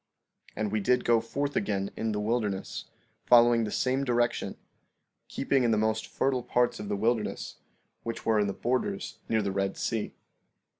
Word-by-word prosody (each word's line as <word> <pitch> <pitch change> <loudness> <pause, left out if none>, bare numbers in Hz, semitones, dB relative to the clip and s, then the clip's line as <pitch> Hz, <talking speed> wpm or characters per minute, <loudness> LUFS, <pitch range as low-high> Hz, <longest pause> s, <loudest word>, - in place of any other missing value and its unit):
And 105 -2 -2
we 110 - +1
did 125 +5 +2
go 115 -1 +4
forth 140 +5 -3
again 100 -1 -1
in 110 0 -1
the 105 - -1
wilderness, 105 -3 -2 0.4
following 120 -1 +6
the 105 - -4
same 130 +2 +1
direction, 120 -2 0 0.7
keeping 135 -2 +1
in 120 - +3
the 110 - +3
most 110 +1 0
fertile 130 -2 0
parts 120 0 +1
of 105 - -6
the 100 - 0
wilderness, 110 +1 -1 0.4
which 115 0 -5
were 110 -1 +3
in 105 - +2
the 100 - -2
borders 130 - -2
near 110 -1 +2
the 100 - -1
Red 95 0 -1
Sea. 110 -2 -2
115 Hz, 170 wpm, -29 LUFS, 105-125 Hz, 0.7 s, following